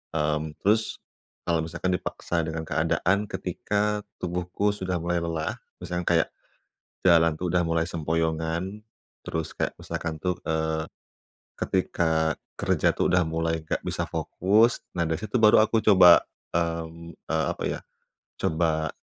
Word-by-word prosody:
Mmm, 75 Hz, 0 st, -1 dB
terus, 110 Hz, +2 st, +2 dB, 0.5 s
kalau 85 Hz, -2 st, +1 dB
misalkan 85 Hz, +3 st, -2 dB
dipaksa 85 Hz, -1 st, -2 dB
dengan 80 Hz, 0 st, -3 dB
keadaan 100 Hz, +5 st, +1 dB
ketika 105 Hz, +1 st, -1 dB, 0.2 s
tubuhku 90 Hz, +3 st, -1 dB
sudah 95 Hz, -3 st, -2 dB
mulai 85 Hz, +1 st, -1 dB
lelah, 80 Hz, -2 st, -2 dB, 0.2 s
misalnya 90 Hz, 0 st, -4 dB
kayak, 85 Hz, -2 st, +3 dB, 0.8 s
jalan 85 Hz, -2 st, +5 dB
tuh, 90 Hz, -, -2 dB
sudah 90 Hz, -, +4 dB
mulai 80 Hz, 0 st, 0 dB
sempoyongan, 80 Hz, +4 st, -2 dB, 0.4 s
terus 80 Hz, -1 st, -4 dB
kayak -, -, -1 dB
misalkan 80 Hz, -2 st, -4 dB
tuh, 90 Hz, +3 st, -1 dB
eee, 80 Hz, 0 st, -1 dB, 0.7 s
ketika 80 Hz, -4 st, +1 dB, 0.2 s
kerja -, -, +1 dB
tuh, -, -, +1 dB
sudah 90 Hz, -3 st, +3 dB
mulai 80 Hz, 0 st, -1 dB
nggak 80 Hz, -, -3 dB
bisa -, -, -2 dB
fokus. 110 Hz, +6 st, +2 dB, 0.2 s
Nah, 85 Hz, -, +1 dB
dari 80 Hz, +1 st, -1 dB
situ 110 Hz, +3 st, -2 dB
baru 110 Hz, -1 st, +6 dB
aku 110 Hz, 0 st, +2 dB
coba, 95 Hz, -5 st, +8 dB, 0.3 s
mmm, 85 Hz, 0 st, -3 dB
eee, 80 Hz, 0 st, -2 dB
apa -, -, -7 dB
ya, -, -, -3 dB, 0.6 s
coba 80 Hz, -2 st, +1 dB
85 Hz, 135 wpm, -26 LUFS, 80-95 Hz, 0.8 s, coba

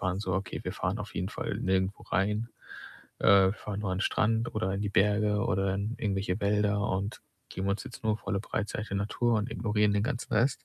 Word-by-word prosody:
waren 95 Hz, +1 st, -1 dB
so: 95 Hz, -3 st, -2 dB
„Okay, 95 Hz, +1 st, -3 dB
wir 90 Hz, -, -2 dB
fahren 95 Hz, +1 st, -2 dB
auf 105 Hz, -, -7 dB
jeden 90 Hz, +2 st, -1 dB
Fall -, -, -3 dB
nirgendwo 95 Hz, +1 st, 0 dB
rein, 105 Hz, +4 st, 0 dB, 0.7 s
äh, 95 Hz, -1 st, +6 dB
fahren 105 Hz, -1 st, -5 dB
nur 100 Hz, -3 st, -2 dB
an 95 Hz, -, -1 dB
'n -, -, 0 dB
Strand 115 Hz, +2 st, +1 dB
oder 95 Hz, -3 st, 0 dB
in 100 Hz, -, -2 dB
die 100 Hz, -, -1 dB
Berge 105 Hz, +1 st, +3 dB
oder 95 Hz, 0 st, +1 dB
in 105 Hz, +4 st, -2 dB
irgendwelche 95 Hz, -2 st, -1 dB
Wälder 105 Hz, 0 st, +2 dB
und 100 Hz, +3 st, -2 dB, 0.3 s
geben 95 Hz, +1 st, -3 dB
uns 100 Hz, +1 st, 0 dB
jetzt 120 Hz, -, -10 dB
nur 110 Hz, -1 st, +2 dB
volle 100 Hz, -1 st, -2 dB
Breitseite 105 Hz, -1 st, -3 dB
Natur 110 Hz, +4 st, +1 dB
und 105 Hz, +3 st, -3 dB
ignorieren 105 Hz, -2 st, +1 dB
den 105 Hz, -, +2 dB
ganzen 120 Hz, -3 st, -3 dB
Rest.“ 125 Hz, +3 st, +2 dB
100 Hz, 210 wpm, -29 LUFS, 95-105 Hz, 0.7 s, äh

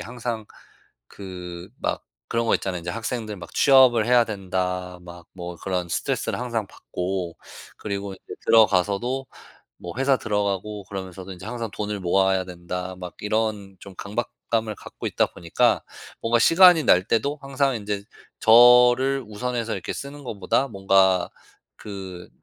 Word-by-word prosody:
항상 120 Hz, -2 st, -5 dB, 0.6 s
그 90 Hz, -2 st, -8 dB
막 -, -, -2 dB, 0.3 s
그런 115 Hz, 0 st, +1 dB
거 -, -, +3 dB
있잖아요. 90 Hz, -2 st, -2 dB
이제 85 Hz, +1 st, -5 dB
학생들 115 Hz, 0 st, -4 dB
막 90 Hz, -, -11 dB
'취업을 130 Hz, -5 st, +6 dB
해야 120 Hz, -1 st, +5 dB
된다.' 90 Hz, -3 st, -3 dB
막 85 Hz, -1 st, -12 dB
뭐 90 Hz, -1 st, -7 dB
그런 90 Hz, -1 st, -3 dB
스트레스를 -, -, -2 dB
항상 115 Hz, -4 st, -2 dB
받고. 90 Hz, -2 st, -5 dB, 0.4 s
그리고 100 Hz, -1 st, -4 dB
이제 -, -, -11 dB
들어가서도 110 Hz, +5 st, +3 dB, 0.5 s
뭐 85 Hz, -, -8 dB
회사 135 Hz, 0 st, +3 dB
들어가고 105 Hz, -1 st, -2 dB
그러면서도 95 Hz, 0 st, -7 dB
이제 90 Hz, +1 st, -11 dB
항상 115 Hz, 0 st, -4 dB
'돈을 105 Hz, 0 st, -4 dB
모아야 95 Hz, +1 st, +2 dB
된다.' 90 Hz, +1 st, -6 dB
막 90 Hz, -3 st, -8 dB
이런 105 Hz, -2 st, -2 dB
좀 100 Hz, -, -11 dB
강박감을 110 Hz, +1 st, -3 dB
갖고 -, -, -10 dB
있다 -, -, +2 dB
보니까 85 Hz, -1 st, +1 dB, 0.4 s
뭔가 115 Hz, +1 st, +2 dB
시간이 170 Hz, +3 st, +7 dB
날 90 Hz, -, +5 dB
때도 140 Hz, +8 st, 0 dB
항상 135 Hz, -1 st, 0 dB
인제 105 Hz, -2 st, -3 dB, 0.4 s
저를 125 Hz, +3 st, +6 dB
우선해서 115 Hz, +1 st, -3 dB
이렇게 -, -, -4 dB
쓰는 140 Hz, +1 st, -8 dB
것보다 125 Hz, +3 st, 0 dB
뭔가 95 Hz, -3 st, +3 dB, 0.5 s
그 95 Hz, -3 st, -8 dB
105 Hz, 305 characters per minute, -24 LUFS, 95-120 Hz, 0.6 s, 시간이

